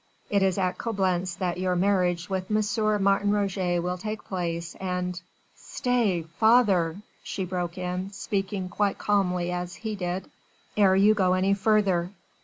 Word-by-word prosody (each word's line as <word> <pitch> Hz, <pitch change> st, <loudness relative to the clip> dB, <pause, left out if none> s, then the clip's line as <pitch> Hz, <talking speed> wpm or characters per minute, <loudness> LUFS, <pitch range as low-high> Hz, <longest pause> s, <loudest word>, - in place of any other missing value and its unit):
It 200 Hz, -1 st, +3 dB
is 190 Hz, -1 st, +2 dB
at 185 Hz, -2 st, -1 dB
Coblentz 185 Hz, -5 st, -1 dB
that 180 Hz, -1 st, -2 dB
your 185 Hz, -1 st, 0 dB
marriage 180 Hz, -2 st, +1 dB
with 190 Hz, -1 st, -3 dB
M. 215 Hz, -1 st, +1 dB
Martin 200 Hz, +1 st, +3 dB
Roget 195 Hz, -3 st, 0 dB
will 180 Hz, 0 st, -2 dB
take 215 Hz, +2 st, -5 dB
place, 170 Hz, -3 st, -3 dB
and...." 180 Hz, -1 st, -3 dB, 0.3 s
"Stay, 235 Hz, -, 0 dB, 0.2 s
father," 205 Hz, -6 st, +4 dB, 0.2 s
she 190 Hz, -, -4 dB
broke 180 Hz, -1 st, -3 dB
in, 180 Hz, +1 st, -3 dB
speaking 195 Hz, -1 st, -3 dB
quite 200 Hz, +2 st, 0 dB
as -, -, -11 dB
calmly 180 Hz, -4 st, +1 dB
as 180 Hz, 0 st, -4 dB
he 220 Hz, -1 st, -4 dB
did, 180 Hz, -1 st, -4 dB, 0.4 s
"ere 195 Hz, -3 st, +5 dB
you 205 Hz, +3 st, +5 dB
go 185 Hz, -3 st, +2 dB
any 190 Hz, +2 st, +2 dB
further. 200 Hz, -4 st, +2 dB
190 Hz, 155 wpm, -26 LUFS, 180-205 Hz, 0.4 s, ere